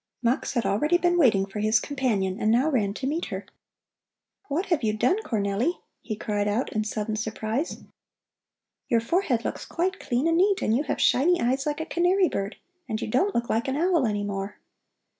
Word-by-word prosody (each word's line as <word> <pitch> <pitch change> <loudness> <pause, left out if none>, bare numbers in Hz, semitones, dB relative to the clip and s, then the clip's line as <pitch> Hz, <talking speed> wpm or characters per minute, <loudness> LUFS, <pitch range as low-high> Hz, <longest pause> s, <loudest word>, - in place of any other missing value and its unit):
Mux 240 +2 0
had 240 -3 0
already 300 - +2
been 350 0 +2
waiting 225 - +4
for 195 +2 -7
his 215 +1 +3
companion 220 -9 -1
and 215 - +2
now 255 +8 +3
ran 210 -7 +1
to 260 - -4
meet 310 +5 -1
her. - - -6 1.0
"What 315 +7 -1
have 340 -6 +1
you 215 -2 +1
done, 365 - +1
Cornelli?" 220 - 0 0.3
he 215 - -4
cried 205 -1 -1
out 210 +5 -1
in 215 - 0
sudden 215 0 -3
surprise. 220 +6 -3 1.0
"Your 235 - +3
forehead 245 - 0
looks - - -3
quite 375 +3 -2
clean 250 +6 0
and 330 0 +3
neat, 395 +1 +3
and 220 - +2
you 260 - +2
have - - -2
shiny 345 +8 +4
eyes 260 +4 0
like 295 +1 -1
a - - -3
canary 360 +2 +2
bird, 200 +2 -3 0.3
and 220 -1 -2
you - - -3
don't 365 - +1
look 235 0 0
like 225 +3 0
an 270 +1 -1
owl 335 -5 +2
any 205 -1 -1
more." 200 0 -4
240 Hz, 195 wpm, -26 LUFS, 215-330 Hz, 1.0 s, waiting